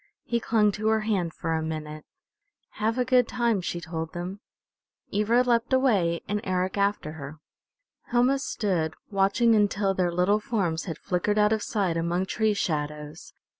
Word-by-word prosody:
He 235 - -1
clung 215 -2 +2
to 215 +2 -3
her 220 0 +3
hand 195 -6 0
for 165 - -3
a 160 - 0
minute. 155 -1 -5 0.7
"Have 220 +3 0
a 250 - +1
good 250 -2 +4
time," 235 -5 0
she 175 0 -3
told 160 -1 -5
them. 180 +3 -5 0.7
Ivra 225 +4 +3
leapt 235 -1 +1
away 200 -11 +2
and 205 0 -1
Eric 185 0 -1
after 200 -6 0
her. 150 -1 -8 0.7
Helma 250 +3 +3
stood 180 - -1 0.2
watching 200 +4 +3
until 205 -2 +2
their 180 -2 0
little 180 +4 +2
forms 195 -7 -1
had 165 -4 -5
flickered 190 +4 -1
out 210 +1 +4
of 220 - -1
sight 190 -7 -1
among 170 +3 0
tree 215 +1 0
shadows. 150 -3 -3
200 Hz, 165 wpm, -26 LUFS, 170-220 Hz, 0.7 s, good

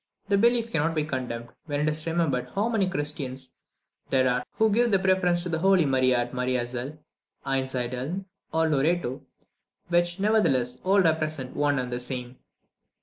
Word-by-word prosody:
This 200 -1 +3
belief 235 0 +3
cannot 165 -1 0
be 155 - +1
condemned, 125 -5 -4 0.2
when 145 -2 -2
it 150 - +1
is 155 +1 -2
remembered 150 -7 0
how 205 +3 +1
many 205 -5 +1
Christians 145 -6 -3 0.6
there 130 -1 +3
are 125 0 +1
who 220 -1 +2
give 240 +3 +3
the 195 - +4
preference 185 -2 +2
to 180 - -4
the 160 -1 -1
Holy 190 -1 +4
Maria 130 -2 +3
at 120 +1 -2
Maria 125 -1 0
Zell, 125 +5 -6 0.5
Einsiedeln, 130 +5 -2 0.3
or 160 0 +2
Loretto, 150 -2 0 0.7
which, 175 +1 +1
nevertheless, 135 - +2
all 195 +1 +4
represent 155 -5 -1
one 145 -1 +1
and 125 -1 -3
the 120 - -2
same. 125 0 -3
150 Hz, 165 wpm, -26 LUFS, 130-180 Hz, 0.7 s, the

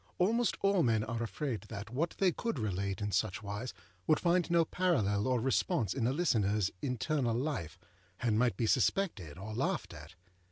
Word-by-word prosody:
Almost 230 +6 +2
all 195 -2 +3
men 115 -6 +2
are 115 +1 -3
afraid 120 0 -3
that 105 0 -7
what 155 +7 -1
they 190 -2 +3
could 230 +2 -3
relate 100 -3 -2
in 105 - -2
such 110 +1 0
wise 105 +5 -4 0.4
would 155 - +4
find 175 0 +2
no 170 -1 +4
parallel 110 - +1
or 130 -1 +2
response 130 - +1
in 120 -4 0
a - - +2
listenerâs 105 - +1
internal 125 -1 0
life, 120 - -3 0.4
and 110 -3 +1
might 125 -1 +2
be 115 - +1
suspected 105 - +1
or 105 +4 -6
laughed - - -1
at. 80 +4 -11
115 Hz, 175 wpm, -33 LUFS, 105-160 Hz, 0.4 s, would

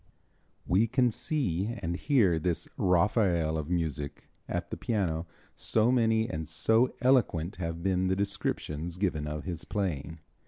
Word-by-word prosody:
We 100 +6 +3
can 125 +1 +2
see 120 - -1
and 85 +1 -2
hear 100 - +3
this 85 +1 -1
"Raphael 90 -3 +2
of 80 0 -3
Music" 80 -4 -2 0.3
at - - -3
the - - -2
piano, 90 -7 -1 0.3
so 110 +2 +2
many 115 -2 +3
and 80 0 -4
so 110 - +2
eloquent 110 -9 +2
have 85 -2 -4
been 95 -1 +1
the 95 - +2
descriptions 90 -4 -2
given 85 -6 -1
of 75 0 -4
his 85 -3 -4
playing. 85 -6 -3
90 Hz, 145 wpm, -29 LUFS, 80-110 Hz, 0.3 s, We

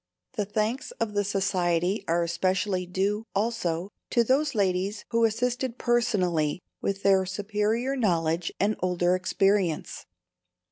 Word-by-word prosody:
The 210 - -1
thanks 215 +5 -1
of 230 -2 -3
the 205 0 +1
Society 190 -1 0
are 170 +1 +2
especially 185 +2 0
due, 200 +5 -1
also, 195 -4 -1 0.2
to 235 - +3
those 275 +3 +1
ladies 195 +1 0
who 230 0 +3
assisted 245 +2 -1
personally 185 -11 +1 0.2
with 195 0 -2
their 195 -1 +5
superior 210 +6 -1
knowledge 170 -8 0
and 210 +2 +2
older 180 -1 +2
experience. 185 -2 0
200 Hz, 125 wpm, -27 LUFS, 180-225 Hz, 0.2 s, their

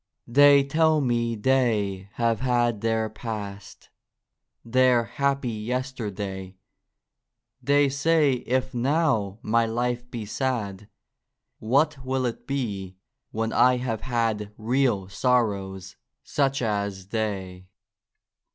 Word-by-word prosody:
They 140 +3 +6
tell 155 +2 +2
me 120 -3 0
they 105 -5 0
have 115 -2 0
had 120 -4 +1
their 115 -1 0
Past, 105 -2 -7 0.8
Their 125 0 +4
happy 140 0 -1
Yesterday; 105 -5 -4 1.1
They 145 0 +3
say 145 +2 +2 0.2
if 130 +1 0
now 125 - +1
my 115 +1 +2
life 120 +1 -2
be 115 -3 -5
sad. 105 -5 -3 0.7
What 140 +4 +1
will 130 0 -1
it 120 - -4
be 100 -9 -3 0.3
when 110 +1 -2
I 125 0 +5
have 120 -3 -3
had 115 -4 -1
Real 115 -4 +1
sorrows, 100 -5 -1 0.3
such 135 -2 0
as 100 -3 -2
they 95 -5 -3
115 Hz, 105 wpm, -25 LUFS, 105-130 Hz, 1.1 s, They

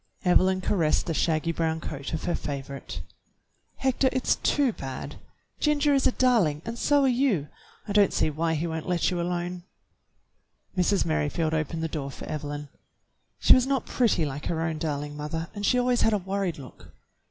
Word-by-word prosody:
Evelyn 185 +1 +4
caressed 170 -5 +1
the 165 - -1
shaggy 160 +1 +1
brown 160 -1 -1
coat 145 -4 -6
of 160 - -3
her 175 - 0
favorite. 135 - -5 0.7
Hector, 265 0 +2
it's 260 -1 +1
too 275 -5 +2
bad. 135 -6 -6 0.4
Ginger 295 -1 +3
is 275 - +3
a - - +3
darling, 210 - +2
and 230 +1 -5
so 290 -1 +3
are - - +4
you; 240 - +1 0.4
I 205 - -2
don't 205 -2 +5
see 155 - +1
why 160 +2 0
he 160 +2 -1
won't 160 -1 -4
let 180 0 +1
you 175 -1 -1
alone." 175 +1 -3 1.1
Mrs. 185 +2 +2
Merrifield 155 0 0
opened 160 +1 -1
the - - 0
door 150 -3 -4
for - - -9
Evelyn. 145 -1 -5 0.7
She - - +7
was 255 0 +3
not 270 -2 0
pretty 220 -10 +2
like 145 +1 -5
her 165 -1 -1
own 160 -1 -2
darling 145 -1 -3
mother, 155 +3 -4
and 205 - -6
she 250 - +3
always 245 -1 +2
had 225 - +3
a - - +3
worried 190 -2 -2
look. 135 -4 -13
170 Hz, 185 wpm, -27 LUFS, 150-215 Hz, 1.1 s, She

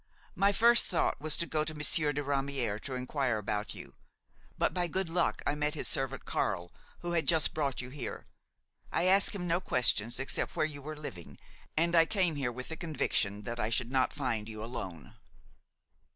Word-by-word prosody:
My 200 +1 +3
first 235 +3 +5
thought 170 -5 0
was 155 -1 +3
to 170 - 0
go 155 -2 0
to 155 0 -4
Monsieur 150 0 +2
de 145 +1 -2
Ramière 135 -6 -1
to 135 - -5
inquire 125 -2 0
about 105 0 -3
you; - - -10 0.6
but - - +1
by 180 -1 0
good 185 +1 -1
luck 175 +2 0
I 145 - +2
met 150 +1 0
his - - -2
servant 135 -1 -1
Carle, 90 0 -1 0.3
who 175 - -3
had 165 -4 +1
just 160 -2 +3
brought 140 -5 -1
you 125 0 -7
here. 140 -2 -6 0.7
I - - +1
asked 195 +2 +4
him 180 -3 -3
no 175 +1 +1
questions 120 - +2
except 135 - -1
where - - +2
you 145 -2 -5
were 155 +2 -6
living, 85 - -8 0.4
and 170 +2 +3
I 165 -1 +6
came 185 -5 +1
here 135 -4 -1
with 130 +2 -7
the 160 - -5
conviction 105 - 0
that 115 +3 -4
I 105 - 0
should 115 +1 0
not 130 -1 +3
find 115 -7 -2
you 110 -1 -6
alone." 95 - -6
145 Hz, 195 wpm, -31 LUFS, 120-165 Hz, 0.7 s, I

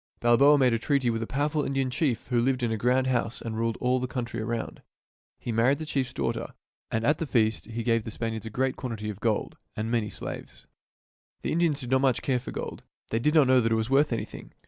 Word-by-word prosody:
Balboa 130 +5 +6
made 130 -3 +4
a 115 - +1
treaty 135 -1 +1
with 115 0 -2
a 115 - -3
powerful 145 +2 0
Indian 135 -2 -1
chief 135 -3 0
who 120 -2 +2
lived 130 0 +1
in 115 - +1
a - - +1
grand 125 +4 +2
house 120 -3 0
and 115 -1 -5
ruled 115 0 -1
all 125 +1 +2
the 130 - -2
country 120 -3 -4
around. 115 +1 -4 0.6
He 120 - -5
married 120 +5 +3
the 155 - -5
chiefs 135 -4 -1
daughter; - - -3 0.3
and 110 0 -1
at 150 +3 +3
the 165 - -1
wedding - - -17
feast 110 -3 +2
the 115 - -12
chief 115 0 -3
gave 115 -2 +2
the - - -6
Span 115 +1 -3
iards 110 0 -6
a - - -4
great 130 +4 0
quantity 110 -4 -4
of 100 - -10
gold 110 -2 -1 0.2
and 110 +2 -3
many 115 -3 0
slaves. - - -8 0.8
The - - -1
Indians 160 -3 +1
did 125 -1 -6
not 130 -2 +3
care 130 -2 +1
much 125 - -6
for - - -7
gold. - - -5 0.3
They 115 - +1
did 150 +6 +1
not 150 -3 +7
know 130 -1 +5
that 115 0 0
it - - +4
was 110 +3 -1
worth 140 +1 +4
anything. 115 - -5
120 Hz, 255 wpm, -27 LUFS, 115-135 Hz, 0.8 s, not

